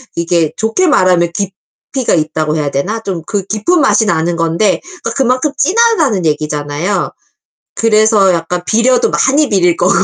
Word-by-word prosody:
이게 170 Hz, -2 st, 0 dB
좋게 225 Hz, +12 st, 0 dB
말하면 180 Hz, -, +2 dB
깊이가 200 Hz, +5 st, -4 dB
있다고 155 Hz, -1 st, -1 dB
해야 145 Hz, -2 st, -2 dB
되나? 200 Hz, +12 st, -2 dB
좀 190 Hz, -5 st, -4 dB
그 205 Hz, -2 st, -2 dB
깊은 220 Hz, -, 0 dB
맛이 250 Hz, -4 st, +3 dB
나는 170 Hz, -3 st, 0 dB
건데 170 Hz, +4 st, 0 dB, 0.2 s
그러니까 -, -, -3 dB
그만큼 260 Hz, +2 st, +1 dB
진하다는 365 Hz, -, +2 dB
얘기잖아요. 150 Hz, +4 st, -2 dB, 0.6 s
그래서 215 Hz, -3 st, +3 dB
약간 175 Hz, +1 st, -3 dB
비려도 245 Hz, +2 st, +2 dB
많이 285 Hz, +1 st, +2 dB
비릴 180 Hz, -5 st, +2 dB
거고. 180 Hz, +2 st, +1 dB
195 Hz, 340 characters per minute, -13 LUFS, 165-235 Hz, 0.6 s, 맛이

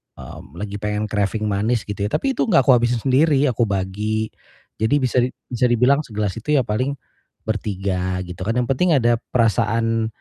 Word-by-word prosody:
mmm, 80 Hz, -, -11 dB
lagi 100 Hz, +2 st, -5 dB
pengen 105 Hz, 0 st, -2 dB
craving 105 Hz, +1 st, -1 dB
manis 110 Hz, +3 st, 0 dB
gitu 105 Hz, -1 st, -7 dB
ya. -, -, -5 dB
Tapi 275 Hz, -, 0 dB
itu 265 Hz, -, -1 dB
gak 175 Hz, -6 st, +4 dB
kuhabisin 120 Hz, -3 st, +3 dB
sendiri, 140 Hz, +2 st, +3 dB
aku 115 Hz, 0 st, 0 dB
bagi. 105 Hz, +3 st, -2 dB, 0.5 s
Jadi 110 Hz, +6 st, +2 dB
bisa 125 Hz, 0 st, +2 dB
di 125 Hz, +1 st, +2 dB, 0.2 s
bisa 125 Hz, 0 st, +2 dB
dibilang 125 Hz, +4 st, +3 dB
segelas 105 Hz, -8 st, -3 dB
itu 150 Hz, +6 st, 0 dB
ya 130 Hz, -, +3 dB
paling 125 Hz, +6 st, -1 dB, 0.5 s
bertiga 95 Hz, -3 st, -2 dB
gitu 90 Hz, 0 st, -9 dB
kan, 115 Hz, -, 0 dB
yang 125 Hz, -1 st, 0 dB
penting 165 Hz, +5 st, +2 dB
ada 120 Hz, -3 st, +2 dB, 0.2 s
perasaan, 115 Hz, -1 st, +1 dB
115 Hz, 175 wpm, -21 LUFS, 105-125 Hz, 0.5 s, gak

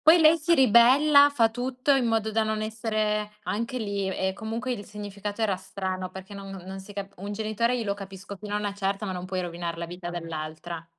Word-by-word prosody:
Poi 325 Hz, +3 st, +7 dB
lei 320 Hz, +1 st, +7 dB
si 335 Hz, +2 st, +3 dB
ribella, 270 Hz, +4 st, +7 dB
fa 230 Hz, -5 st, +3 dB
tutto 255 Hz, +3 st, +1 dB
in 255 Hz, -3 st, +2 dB
modo 220 Hz, -1 st, +1 dB
da 220 Hz, +1 st, +2 dB
non 215 Hz, 0 st, -1 dB
essere 215 Hz, -1 st, -1 dB
anche 230 Hz, +4 st, -2 dB
lì 200 Hz, -3 st, -2 dB
e 190 Hz, 0 st, -1 dB
comunque 225 Hz, +5 st, -3 dB
il 205 Hz, -4 st, -5 dB
significato 205 Hz, +1 st, -5 dB
era 200 Hz, -4 st, +2 dB
strano 190 Hz, -1 st, -4 dB
perché 190 Hz, +1 st, -10 dB
non 195 Hz, -1 st, -8 dB, 0.2 s
non 190 Hz, +1 st, -7 dB
si 205 Hz, +2 st, -11 dB
cap 200 Hz, 0 st, -5 dB
un 200 Hz, +2 st, -5 dB
genitore 220 Hz, +3 st, 0 dB
io 230 Hz, -, -2 dB
lo 200 Hz, -, 0 dB
capisco 195 Hz, 0 st, -9 dB
fino 210 Hz, 0 st, -5 dB
a -, -, +2 dB
una 205 Hz, -1 st, -2 dB
certa, 200 Hz, +1 st, -2 dB
ma 190 Hz, -, -2 dB
non 180 Hz, 0 st, -5 dB
puoi 185 Hz, -1 st, -2 dB
rovinar 170 Hz, -1 st, -4 dB
la 170 Hz, -, -3 dB
vita 175 Hz, +1 st, -7 dB
dell'altra. 165 Hz, 0 st, -5 dB
205 Hz, 220 wpm, -27 LUFS, 190-230 Hz, 0.2 s, Poi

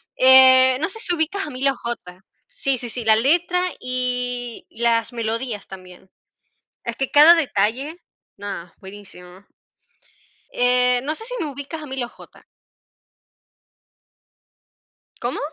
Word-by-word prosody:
eh, 260 Hz, 0 st, +7 dB
no 320 Hz, -, -1 dB
sé, 420 Hz, +4 st, -7 dB
si 410 Hz, -5 st, -2 dB
ubicas 345 Hz, +4 st, -2 dB
a -, -, -8 dB
Emilio 275 Hz, 0 st, 0 dB
J. 210 Hz, -7 st, -5 dB, 0.2 s
Sí, 270 Hz, -1 st, -1 dB
sí, 245 Hz, -, -5 dB
sí, 240 Hz, +1 st, -4 dB
la 220 Hz, -1 st, +5 dB
letra 345 Hz, +9 st, +1 dB, 0.2 s
y 250 Hz, -1 st, -4 dB
las 230 Hz, 0 st, -1 dB
melodías 230 Hz, -1 st, -4 dB
también. 185 Hz, -1 st, -14 dB, 0.8 s
Es 235 Hz, -, -4 dB
que 270 Hz, +1 st, -3 dB
cada 305 Hz, +4 st, +7 dB
detalle 275 Hz, -, -2 dB, 0.4 s
nada, 195 Hz, -4 st, -8 dB
buenísimo. 190 Hz, -2 st, -12 dB, 1.1 s
Eh, 250 Hz, 0 st, +2 dB
no 305 Hz, +3 st, -3 dB
sé 445 Hz, -, -7 dB
si -, -, -6 dB
me 300 Hz, -, -5 dB
ubicas 285 Hz, +3 st, -7 dB
a 300 Hz, -, -9 dB
Emilio 265 Hz, -3 st, -4 dB
J. -, -, -18 dB, 2.8 s
¿Cómo? 240 Hz, +2 st, -4 dB
250 Hz, 130 wpm, -20 LUFS, 225-285 Hz, 2.8 s, eh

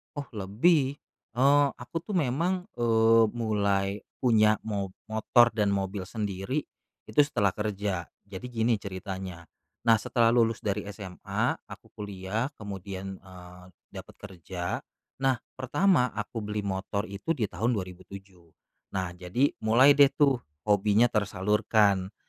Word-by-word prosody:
Oh 145 Hz, -1 st, -6 dB
lebih. 130 Hz, -, +2 dB, 0.4 s
Eee, 140 Hz, +3 st, +5 dB
aku 120 Hz, +6 st, -7 dB
tuh 210 Hz, -, -5 dB
memang, 180 Hz, -, 0 dB
eee, 115 Hz, -1 st, +5 dB
mulai 100 Hz, -4 st, +1 dB, 0.3 s
punya 110 Hz, -4 st, +4 dB
mo 100 Hz, -3 st, -3 dB, 0.2 s
motor 120 Hz, +2 st, +4 dB
dan 105 Hz, -2 st, +1 dB
mobil 95 Hz, -1 st, -2 dB
sendiri 105 Hz, +6 st, -3 dB, 0.5 s
itu -, -, 0 dB
setelah 105 Hz, -8 st, +1 dB
kerja. 100 Hz, -4 st, -3 dB, 0.2 s
Jadi 100 Hz, +3 st, -9 dB
gini 115 Hz, -1 st, +1 dB
ceritanya, 95 Hz, -2 st, -6 dB, 0.4 s
nah 115 Hz, -1 st, +5 dB
setelah 115 Hz, +2 st, +2 dB
lulus 115 Hz, -2 st, +2 dB
dari 105 Hz, 0 st, -1 dB
SMA, 100 Hz, -3 st, -3 dB
aku -, -, -12 dB
kuliah 100 Hz, +3 st, -3 dB
kemudian, 95 Hz, -2 st, -7 dB
eee, 90 Hz, -1 st, -13 dB, 0.2 s
dapet -, -, -10 dB
kerja. 90 Hz, -2 st, -5 dB, 0.5 s
Nah 130 Hz, -1 st, +4 dB, 0.2 s
pertama 130 Hz, -, +2 dB
aku 105 Hz, +1 st, -5 dB
beli 105 Hz, 0 st, -2 dB
motor 100 Hz, +1 st, -3 dB
itu 100 Hz, +12 st, -2 dB
di 115 Hz, -8 st, -2 dB
tahun 115 Hz, +7 st, 0 dB
2007, 95 Hz, -2 st, -8 dB, 0.4 s
nah 95 Hz, -2 st, -1 dB
jadi 90 Hz, +10 st, 0 dB, 0.2 s
mulai 130 Hz, +6 st, +6 dB
deh 140 Hz, -1 st, +8 dB
tuh 140 Hz, -4 st, +3 dB, 0.3 s
hobinya 105 Hz, +3 st, +4 dB
tersalurkan, 105 Hz, -1 st, +1 dB
105 Hz, 125 wpm, -28 LUFS, 95-120 Hz, 0.5 s, deh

